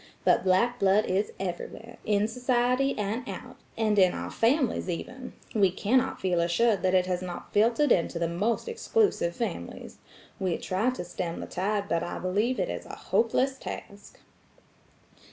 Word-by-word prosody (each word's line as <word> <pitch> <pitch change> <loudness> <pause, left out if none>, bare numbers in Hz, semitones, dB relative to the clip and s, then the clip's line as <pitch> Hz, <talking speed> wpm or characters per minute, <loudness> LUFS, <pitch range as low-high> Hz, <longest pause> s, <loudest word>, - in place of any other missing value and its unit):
But - - +4
black 215 +7 +2
blood 195 +2 +4
is 195 +3 0
everywhere–in 205 +3 -2
society 250 +3 +1
and 210 +3 -1
out, - - -8 0.2
and 215 -2 +2
in 185 -2 +5
our - - -5
families 250 -3 +1
even; 250 +9 -5 0.2
we 200 -4 +4
cannot 225 +8 +1
feel 180 -2 +1
assured 195 +6 +2
that 185 0 +2
it 180 -1 +4
has 180 -1 -1
not 180 -1 -7
filtered 235 +6 +3
into 170 0 +2
the 170 0 0
most 205 - -1
exclusive 430 - +1
families. 195 - -5 0.4
We 185 -3 0
try 195 +7 0
to 255 -8 -4
stem 175 -1 -4
the - - -5
tide 200 +2 -1
but 170 -3 0
I 175 - -4
believe 210 +8 0
it - - +1
is - - -5
a - - -7
hopeless 260 +3 +1
task." 200 0 -8
205 Hz, 160 wpm, -28 LUFS, 185-240 Hz, 0.4 s, in